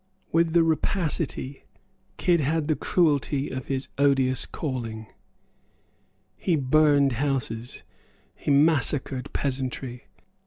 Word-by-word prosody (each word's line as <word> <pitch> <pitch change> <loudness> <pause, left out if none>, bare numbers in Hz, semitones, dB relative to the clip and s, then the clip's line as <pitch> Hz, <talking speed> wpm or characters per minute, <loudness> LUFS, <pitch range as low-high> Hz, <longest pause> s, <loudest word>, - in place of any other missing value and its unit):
With 165 0 +2
the 170 -1 +5
rapacity 160 -4 -1 0.5
Kidd 175 -2 +3
had 155 +2 0
the 155 - +2
cruelty 145 -5 +1
of 130 -1 -5
his 135 -1 -2
odious 135 -2 +2
calling. 115 -7 -4 1.3
He 175 - +1
burned 145 0 +4
houses; 125 -3 -3 0.5
he - - -5
massacred 140 -3 +2
peasantry. 130 -2 -3
140 Hz, 100 wpm, -26 LUFS, 130-155 Hz, 1.3 s, the